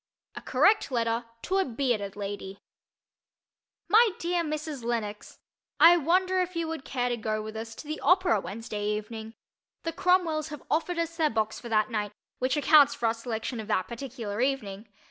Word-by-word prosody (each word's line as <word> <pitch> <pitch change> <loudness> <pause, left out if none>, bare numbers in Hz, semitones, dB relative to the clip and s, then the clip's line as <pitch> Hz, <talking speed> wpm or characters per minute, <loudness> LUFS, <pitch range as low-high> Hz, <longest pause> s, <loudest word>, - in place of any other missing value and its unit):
A - - -6
CORRECT 425 -4 +3
LETTER 230 -2 0 0.2
TO 385 +2 +1
A - - +4
BEARDED 235 - -1
LADY 200 -1 -6 1.3
My 455 +2 +6
dear 345 0 0
Mrs. 305 -4 -4
Lenox: 220 -3 -4 0.4
I 340 +1 +9
wonder 370 +4 +2
if 365 0 -3
you 335 -1 -1
would 320 -4 -5
care 245 -2 -1
to 245 - 0
go 215 -1 -2
with 220 0 -7
us 225 +1 -6
to 295 - -10
the 310 +1 -4
opera 360 - +3
Wednesday 210 +3 -6
evening? 220 +2 -4 0.5
The 330 - -3
Cromwells 355 -4 +2
have 300 -2 -8
offered 335 +3 0
us 335 0 -2
their 315 -2 +3
box 220 -1 -1
for 235 - -9
that 215 0 +2
night, 210 -2 -2 0.3
which 255 +4 +1
accounts 295 0 +6
for 235 - -3
our 225 - +3
selection 230 +1 -4
of 215 - -6
that 185 -4 0
particular 235 -3 -5
evening. 225 -6 -2
245 Hz, 180 wpm, -28 LUFS, 220-325 Hz, 1.3 s, I